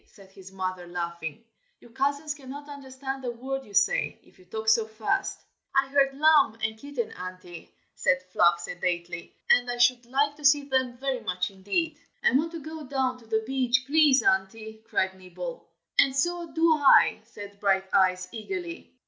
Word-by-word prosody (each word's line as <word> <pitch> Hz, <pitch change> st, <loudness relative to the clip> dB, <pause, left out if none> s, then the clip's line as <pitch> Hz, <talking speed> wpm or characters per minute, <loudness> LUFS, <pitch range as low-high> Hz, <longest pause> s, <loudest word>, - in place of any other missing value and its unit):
said 195 Hz, -3 st, -18 dB
his 190 Hz, -1 st, -13 dB
mother, 185 Hz, -2 st, -4 dB
laughing. 170 Hz, +3 st, -5 dB, 0.3 s
"Your 240 Hz, -, -18 dB
cousins 285 Hz, +4 st, -1 dB
cannot 285 Hz, 0 st, -10 dB
understand 270 Hz, -1 st, -7 dB
a 250 Hz, -, -2 dB
word 265 Hz, +3 st, -4 dB
you 205 Hz, -5 st, -12 dB
say, 205 Hz, +1 st, +2 dB
if -, -, -24 dB
you 185 Hz, -, -19 dB
talk 220 Hz, +4 st, -6 dB
so 220 Hz, 0 st, +4 dB
fast." 220 Hz, -, -2 dB, 0.3 s
"I 270 Hz, 0 st, +3 dB
heard 275 Hz, -1 st, +2 dB
'lamb' 300 Hz, -6 st, +5 dB
and 220 Hz, 0 st, 0 dB
'kitten,' 250 Hz, -1 st, -5 dB
Auntie," 180 Hz, -1 st, -9 dB, 0.2 s
said 180 Hz, 0 st, +1 dB
Fluff, 170 Hz, -1 st, +4 dB
sedately, 175 Hz, 0 st, -4 dB, 0.2 s
"and 245 Hz, 0 st, +4 dB
I 245 Hz, -, -2 dB
should 240 Hz, 0 st, +3 dB
like 285 Hz, +3 st, +1 dB
to 300 Hz, -, -14 dB
see 290 Hz, 0 st, +5 dB
them 260 Hz, -3 st, -1 dB
very 265 Hz, 0 st, -2 dB
much 180 Hz, +1 st, -2 dB
indeed." 290 Hz, -, -2 dB, 0.2 s
"I -, -, +5 dB
want 310 Hz, +5 st, +1 dB
to 335 Hz, -, -5 dB
go 315 Hz, 0 st, -7 dB
down 260 Hz, -2 st, -1 dB
to 230 Hz, -, -19 dB
the 220 Hz, 0 st, 0 dB
beach, 255 Hz, 0 st, +1 dB
please, 290 Hz, -1 st, +4 dB
Auntie!" 220 Hz, +3 st, 0 dB
cried 190 Hz, -4 st, 0 dB
Nibble. 190 Hz, -, -8 dB, 0.3 s
"And 270 Hz, -1 st, +5 dB
so 345 Hz, +3 st, -1 dB
do 325 Hz, 0 st, +4 dB
I!" 285 Hz, -6 st, +5 dB
said 205 Hz, -3 st, -11 dB
Brighteyes, 190 Hz, -2 st, +2 dB
eagerly. 340 Hz, -, -6 dB
245 Hz, 175 wpm, -27 LUFS, 190-280 Hz, 0.3 s, lamb